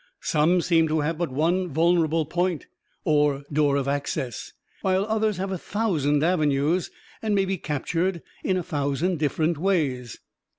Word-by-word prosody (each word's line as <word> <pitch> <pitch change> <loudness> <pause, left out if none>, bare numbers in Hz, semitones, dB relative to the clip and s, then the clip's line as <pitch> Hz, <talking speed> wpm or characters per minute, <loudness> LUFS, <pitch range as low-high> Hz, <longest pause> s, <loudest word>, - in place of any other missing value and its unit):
Some 165 +3 +3
seem 165 -2 +3
to 155 0 +1
have 155 +2 -2
but 175 - -1
one 170 +7 +1
vulnerable 165 0 +2
point, 175 +1 -1 0.4
or 145 -2 +2
door 145 -1 +3
of 140 -1 0
access; 140 -4 -3 0.3
while 190 +1 +1
others 220 -2 0
have 190 +1 -3
a 190 - -3
thousand 155 -10 0
avenues, 155 0 +1 0.3
and 215 -2 0
may 195 -1 +2
be 190 -1 -2
captured 170 +4 -2 0.2
in 185 - +1
a 180 - -2
thousand 145 +4 -1
different 155 +1 0
ways. 145 - 0
165 Hz, 155 wpm, -25 LUFS, 145-185 Hz, 0.4 s, Some